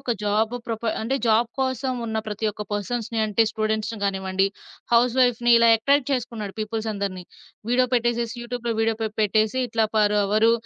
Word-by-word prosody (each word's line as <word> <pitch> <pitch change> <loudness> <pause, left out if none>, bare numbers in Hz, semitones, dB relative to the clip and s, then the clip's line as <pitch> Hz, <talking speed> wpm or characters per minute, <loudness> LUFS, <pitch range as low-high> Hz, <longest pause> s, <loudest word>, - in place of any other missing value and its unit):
ఒక 240 - -1
జాబ్ 215 +3 +1
ప్రొఫై 225 -1 -2
అంటే 265 +5 0
జాబ్ 230 +1 +3
కోసం 260 0 -1
ఉన్న 220 0 -3
ప్రతి 215 +1 -3
ఒక్క 210 - -6
పర్సన్స్‌ని, 225 +2 -2
అంటే 215 +2 +2
స్టూడెంట్స్‌ని 220 0 -2
గానివ్వండి, 190 0 0 0.5
హౌస్‌వైఫ్‌ని 245 0 +3
ఇలా 230 0 +5
అట్రాక్ట్ 280 +4 +2
చేసుకున్నాడు 225 -5 -3
పీపుల్స్ 220 +1 -3
అందరిని. 190 -3 -4 0.5
వీడియో 250 +1 +3
పెట్టేసేసి 235 0 0
యూట్యూబ్‌లో 240 -1 -3
వీడియో 225 0 +1
పె 220 - 0
పెట్టేసి 215 +3 +2
ఇట్లా 225 -1 +1
"పర్ 210 -1 +3
అవరు 215 +3 +3
225 Hz, 160 wpm, -24 LUFS, 215-240 Hz, 0.5 s, ఇలా